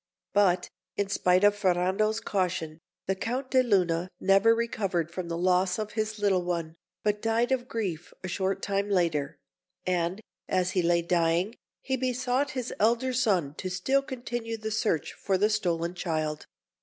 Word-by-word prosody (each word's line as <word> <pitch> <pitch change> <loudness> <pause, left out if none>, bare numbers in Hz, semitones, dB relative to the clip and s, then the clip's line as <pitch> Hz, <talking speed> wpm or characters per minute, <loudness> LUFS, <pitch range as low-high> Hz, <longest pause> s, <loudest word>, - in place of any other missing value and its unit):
But, 185 -3 +3 0.3
in 200 -1 0
spite 185 -1 +3
of 205 0 +6
Ferrando's 195 +3 +1
caution, 180 -6 -2 0.3
the 190 - +1
Count 250 +7 -3
de 260 - +5
Luna 180 -7 +1
never 195 +4 +5
recovered 205 -8 -1
from 180 0 -5
the 165 0 -3
loss 180 +1 +2
of 215 -1 -3
his 215 0 -2
little 200 -3 +2
one, 170 -2 -3 0.3
but 210 0 0
died 225 +2 +1
of 250 -2 0
grief 185 -9 -3
a - - -3
short 190 +2 -1
time 200 0 -1
after; 165 -7 +1 0.5
and 180 +1 0 0.3
as 185 -1 +1
he 185 - +1
lay 170 0 +2
dying, 170 +4 +1 0.3
he 265 0 -1
besought 255 +2 0
his 250 -1 -3
elder 240 +4 +2
son 190 - +1
to 185 - -3
still 225 +10 +1
continue 240 -3 -4
the 220 0 -4
search 210 -8 0
for 195 -1 0
the 210 +3 +2
stolen 170 -5 0
child. 155 -4 -2
195 Hz, 165 wpm, -28 LUFS, 175-225 Hz, 0.5 s, of